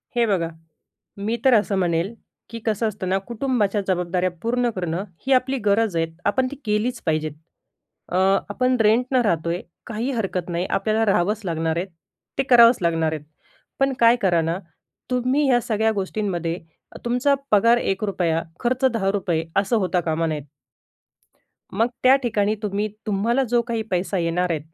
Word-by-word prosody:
हे 240 -1 +3
बघा, 190 -6 0 0.7
मी 210 +3 -1
तर 265 - +6
असं 210 -2 +3
म्हणेल, 175 +2 0 0.4
की 230 - -7
कसं 220 0 +1
असतं 190 -3 -4
ना 190 - +2
कुटुंबाच्या 230 -4 0
जबाबदाऱ्या 180 0 0
पूर्ण 245 +1 +1
करणं, 175 0 -2 0.2
ही 270 - +4
आपली 260 +1 +2
गरज 205 -1 +2
आहे. 165 - +2 0.2
आपण 260 +4 +2
ती - - -6
केलीच 215 +3 0
पाहिजेत. 155 -1 0 0.8
अ, 180 - +1 0.3
आपण 255 +4 +1
रेंटनं 245 +4 +3
राहतोय, 170 -5 0 0.3
काही 230 +4 -2
हरकत 190 -7 -2
नाही, 175 +1 -1
आपल्याला 220 +1 +1
राहावंच 205 +2 +1
लागणार 165 -1 -1
आहे, 175 - -1 0.5
ते 270 - +2
करावंच 235 -1 +7
लागणार 165 -2 +1
आहेत. 155 -2 -5 0.6
पण 270 0 +2
काय 230 0 +6
करा 175 -4 +3
ना, 165 +2 -1 0.5
तुम्ही 255 +4 +1
या 245 -2 +5
सगळ्या 220 -1 +1
गोष्टींमध्ये 190 -4 -2 0.5
तुमचा 250 +4 +2 0.2
पगार 230 +3 +5
₹1 190 -6 0 0.2
खर्च 255 +2 -1
₹10 195 -6 0
असं 200 +4 +2
होता 185 -3 +1
कामा 160 0 -1
नयेत. 155 -2 -3 1.3
मग 220 +4 +2 0.2
त्या 255 +1 +7
ठिकाणी 215 -3 +1
तुम्ही, 210 +1 -1 0.2
तुम्हाला 220 +6 +1
जो 240 -1 +4
काही 230 -1 -2
पैसा 185 +1 0
येणार 175 +1 0
आहे, 160 -3 0
205 Hz, 155 wpm, -23 LUFS, 175-235 Hz, 1.3 s, करावंच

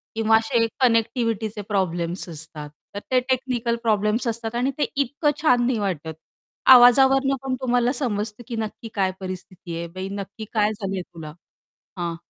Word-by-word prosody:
किंवा 220 0 +4
असे 230 +1 +1
कनेक्टिव्हिटीचे 230 -3 +1
प्रॉब्लेम्स 175 -2 -1
असतात. 155 -2 -8 0.3
तर - - -2
ते 255 - +5
टेक्निकल 245 -2 0
प्रॉब्लेम्स 215 +2 +1
असतात 230 0 -3
आणि 255 +3 +1
ते - - +2 0.2
इतकं 285 +3 0
छान 245 -6 +4
नाही 250 -2 +1
वाटत. 165 -5 -3 0.6
आवाजावरून 270 +2 +6
पण 265 -1 -2
तुम्हाला 245 -1 +2
समजतं 220 -3 -3
की 235 - -4
नक्की 220 +1 -5
काय 190 -2 +1
परिस्थिती 185 -2 -7
आहे, 170 0 -4
"बाई 185 +3 -6
नक्की 200 +2 -6
काय 210 -1 +2
झालंय 195 -2 -3
तुला?" 160 -3 -10 0.6
हां. 170 -1 -3
220 Hz, 150 wpm, -23 LUFS, 190-245 Hz, 0.6 s, आवाजावरून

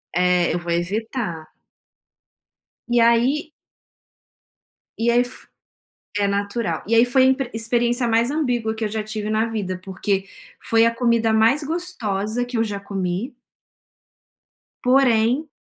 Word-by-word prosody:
É, 180 -1 +2
eu 175 - -1
vou 170 0 -5
evitar. 185 -1 -3 1.4
E 240 0 +2
aí 245 +7 +2 1.5
e 230 +1 +1
aí 240 +1 +4
f 245 +1 -10 0.7
é 200 - +2
natural. 200 -3 -2
E 225 - -2
aí 230 +1 +6
foi 260 +1 +3
a - - +6
impre 265 -1 +1
experiência 240 +2 0
mais 230 +2 +2
ambígua 245 -7 -1
que 220 - -4
eu 215 - -1
já 220 +1 -2
tive 215 0 -5
na 215 +1 +1
vida, 200 -5 -4
porque 195 +1 -2 0.3
foi 230 0 +3
a 230 - +2
comida 230 -2 +2
mais 225 +7 +3
gostosa 245 - -2
que 245 0 -4
eu 225 - +2
já 205 -3 -4
comi 195 +4 -3 1.5
porém, 250 +2 +3
225 Hz, 140 wpm, -22 LUFS, 200-245 Hz, 1.5 s, aí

